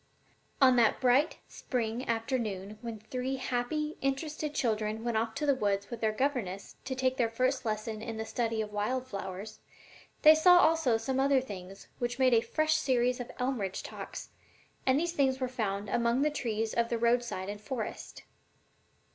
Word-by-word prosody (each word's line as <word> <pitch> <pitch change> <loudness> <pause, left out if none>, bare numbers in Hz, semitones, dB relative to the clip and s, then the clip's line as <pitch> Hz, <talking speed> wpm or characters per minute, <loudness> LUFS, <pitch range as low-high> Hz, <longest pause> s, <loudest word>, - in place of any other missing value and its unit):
_ - - -39 0.6
On 255 -1 +5
that 230 -2 +4
bright 260 +4 +3
spring 235 0 -3
afternoon 220 -4 -2
when 230 -2 -5
three 255 +5 -3
happy, 265 +4 -2
interested 295 +2 -2
children 220 -3 -1
went 235 -1 -1
off 220 0 0
to 300 - -1
the 285 - +4
woods 200 -5 -1
with 235 - -6
their 220 -1 +2
governess 215 -6 -2
to 260 0 -3
take 260 0 0
their 235 -4 +2
first 255 +3 0
lesson 215 0 -3
in 225 0 -5
the 220 - -3
study 225 -1 -1
of 210 -1 -9
wild 250 +5 -1
flowers, 195 -2 -6 0.6
they 310 0 +10
saw 355 +3 +7
also 320 -9 +4
some 260 +4 -2
other 275 0 +4
things 195 -5 -9
which 245 0 -2
made 260 -2 +4
a 225 - +5
fresh 310 +5 +1
series 250 -3 +1
of 245 - -5
"Elmridge 245 -7 -2
Talks," - - -7 0.6
and 260 +2 +4
these 340 +1 -1
things 265 -4 +2
were 255 - 0
found 210 -5 -2
among 235 +5 +1
the 300 - +2
trees 225 -6 -2
of 235 0 +1
the 235 - 0
roadside 235 -5 +1
and 205 +1 -6
forest. 225 -1 -5
240 Hz, 180 wpm, -30 LUFS, 220-265 Hz, 0.6 s, they